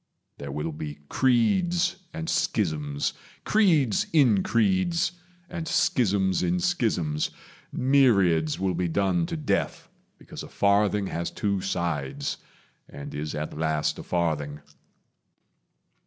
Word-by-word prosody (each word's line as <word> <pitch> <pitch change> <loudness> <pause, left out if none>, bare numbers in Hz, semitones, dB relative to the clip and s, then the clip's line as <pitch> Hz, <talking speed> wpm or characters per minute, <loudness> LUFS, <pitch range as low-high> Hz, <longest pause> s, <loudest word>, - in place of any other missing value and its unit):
There 70 -1 -6
will 75 +3 -3
be 75 -1 -6
creeds 170 - +2
and 165 0 -5
schisms, 75 - -1 0.3
creeds 160 - +3
in 125 -11 +4
creeds, 115 - +1 0.4
And 170 -3 -5
schisms 95 - +2
in 180 +1 +1
schisms; 110 - 0 0.4
myriads 100 - +3
will 95 -1 0
be 90 +1 -1
done 90 -1 +1
To 165 - -4
death 150 -3 -2 0.3
because - - -10
a - - -8
farthing 100 0 +2
has 85 -2 -3
two 100 -2 -1
sides, 75 -7 -2 0.5
And 70 0 -8
is 75 +1 -4
at 75 0 -4
last 80 -1 -1
a - - -6
farthing. 75 -4 -2
95 Hz, 115 wpm, -26 LUFS, -, 0.5 s, in